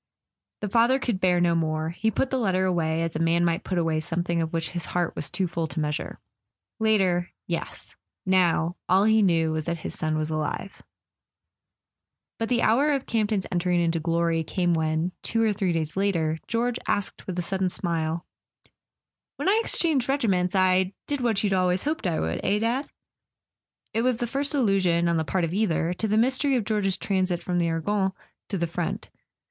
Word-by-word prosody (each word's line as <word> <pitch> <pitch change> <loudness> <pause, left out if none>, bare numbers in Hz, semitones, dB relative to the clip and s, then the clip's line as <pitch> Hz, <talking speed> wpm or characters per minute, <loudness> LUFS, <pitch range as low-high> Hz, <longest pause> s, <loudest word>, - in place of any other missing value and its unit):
The 210 - -2
father 235 +5 +4
could 240 -7 -2
bear 180 -1 +3
no 175 -1 +3
more; 160 -1 0
he 220 +6 0
put 255 +5 -1
the 265 - +1
letter 190 -4 +1
away, 165 -3 0
as 165 - -3
a - - -1
man 165 +1 +2
might 170 +3 0
put 185 - -2
away 165 -2 +1
something 170 +2 -1
of 160 -1 -2
which 165 -1 -2
his 175 -2 -3
heart 175 -2 -1
was 145 - -2
too 190 - -1
full 165 -1 -2
to 145 +2 -5
measure 150 -1 -3 0.6
it. - - -3
Later—yes; 180 -5 -1 0.3
now, 175 -2 +2
all 190 +2 +5
he 220 +1 +4
knew 165 -5 +2
was 155 -1 -2
that 170 -1 -3
his - - -3
son 155 0 -1
was 155 0 -2
alive. 155 +5 -3 1.6
But 225 - -2
the 240 -1 +2
hour 275 +7 +3
of 275 -2 -2
Campton's 215 -3 0
entering 175 0 +1
into 165 -1 +1
glory 165 0 0
came 175 +2 0
when, 160 +2 0
two 225 0 0
or 220 -2 +2
three 190 -3 0
days 160 -2 -2
later, 165 -5 0
George 235 +1 0
asked 205 - -2
with 185 -2 -4
a 180 - 0
sudden 190 +1 -1
smile: 165 -2 -2 1.1
"When - - -3
I 415 +3 +4
exchanged 295 - +2
regiments 195 -10 +1
I 185 0 +3
did 285 -2 -2
what 225 -4 +1
you'd 200 -2 +1
always 185 -1 +1
hoped 300 -8 -1
I 165 - 0
would, 80 +1 -2
eh, 200 +2 +2
Dad?" 235 +6 -1 1.0
It 225 - +1
was 250 -1 +1
the 240 - -1
first 280 +4 -1
allusion, 190 -9 +2
on 170 -1 +2
the 160 - +1
part 180 +3 -1
of 165 - -5
either, 175 -4 +1
to 220 +5 -2
the 215 +1 +1
mystery 260 +4 +2
of 235 -5 0
George's 195 -3 0
transit 185 -3 -1
from 175 -1 -1
the 170 -1 +1
Argonne 190 +4 0 0.4
to 200 - -2
the 170 - 0
front. 170 0 -4
180 Hz, 195 wpm, -25 LUFS, 165-215 Hz, 1.6 s, all